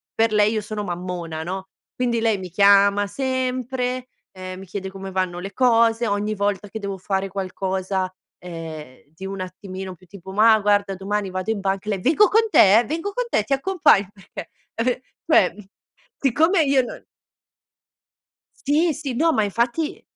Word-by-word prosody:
per 225 -1 +2
lei 210 +1 +3
io 215 - -1
sono 210 0 -5
mammona, 175 -3 -5
no. 190 +3 -5 0.3
Quindi 240 -2 0
lei 225 -3 +1
mi 185 - -7
chiama 200 +2 +5
sempre, 255 +1 -2 0.2
ehm, 185 0 -8
mi 190 - -10
chiede 190 +1 -5
come 195 0 -8
vanno 185 -2 -1
le 195 +2 -7
cose. 230 -1 +3
Ogni 205 +1 -1
volta 205 0 -1
che 220 +2 -7
devo 200 -2 -4
fare 190 +1 -2
qualcosa, 190 0 -3 0.3
ehm, 160 -6 -9
di 190 +4 -9
un 195 0 -6
attimino 185 0 -7
più 185 +1 -22
tipo: 190 0 -11
"Mà 220 +2 +5
guarda, 205 -1 +1
domani 200 +1 -2
vado 185 +3 -3
in 220 - -2
banca", 195 0 -2
e - - -2
lei: 195 -3 -2
"Vengo 330 - +4
con 435 +5 +4
te? 215 - +6
Vengo 330 +7 -3
con - - -1
te, 215 - +1
ti 275 - -1
accompagn" 290 - +3
perchè, 195 -2 -10 0.2
eh, 230 - -2
ve 250 +1 0 0.3
cioè, 185 - +5
mhmm, 210 -1 -13 0.5
siccome 320 - +3
io 275 -2 +3
non - - -8 1.6
Sì, 315 +3 +3
sì. 285 -3 -4
No, 325 +7 +2
ma 220 -8 +2
infatti 235 - -1
205 Hz, 175 wpm, -22 LUFS, 190-245 Hz, 1.6 s, te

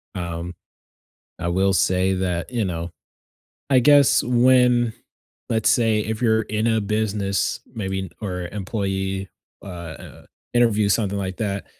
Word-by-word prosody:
Um, 85 -1 -5 0.9
I 85 - -3
will 95 +2 +2
say 95 0 +2
that, 90 -1 -2
you 120 -3 0
know 85 -2 -4 0.8
I 130 - +6
guess 145 +2 +5
when, 125 -1 +3 0.6
let's 110 -2 +2
say, 115 -4 +3
if 110 +2 -4
you're 110 -2 +3
in 110 +2 -1
a 110 -1 +2
business, 100 -2 -1
maybe 95 -3 -3
in 95 - -5
or 90 -4 -4
employee, 95 -1 -3 0.3
ah, - - -10 0.3
uh, - - -13 0.3
interview, 110 -4 +3
something 100 -1 +1
like 95 -1 -4
that, 100 -3 -3
100 Hz, 135 wpm, -22 LUFS, 95-115 Hz, 0.9 s, I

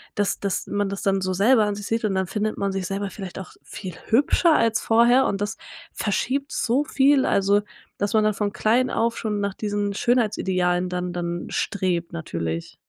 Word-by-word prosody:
Dass 205 -1 0
dass 200 -2 -2
man 205 -1 -1
das 200 0 -5
dann 195 -1 +1
so 185 0 -1
selber 215 +4 +4
an 205 0 -1
sich 205 0 -7
sieht 225 0 -1
und 195 - 0
dann 190 -1 0
findet 215 +3 -2
man 200 0 -1
sich 190 -1 -3
selber 200 0 -3
vielleicht 190 -2 -8
auch 190 - -9
viel 185 -4 -8
hübscher 295 +7 +3
als 225 -1 +2
vorher 235 +3 +4
und 195 - -2
das 205 +1 -2 0.4
verschiebt 265 +7 -1
so 260 +6 +1
viel. 275 -2 +3
Also, 200 +1 +3 0.4
dass 205 +2 -1
man 215 -1 +4
dann 215 - +2
von 205 0 -2
klein 245 +4 +2
auf 230 0 0
schon 210 -2 -2
nach 200 -1 -1
diesen 205 0 -2
Schönheitsidealen 185 -6 +1
dann 180 0 -3
dann 175 0 -3
strebt 180 -5 -1
natürlich. 85 - -4
205 Hz, 195 wpm, -23 LUFS, 190-225 Hz, 0.4 s, selber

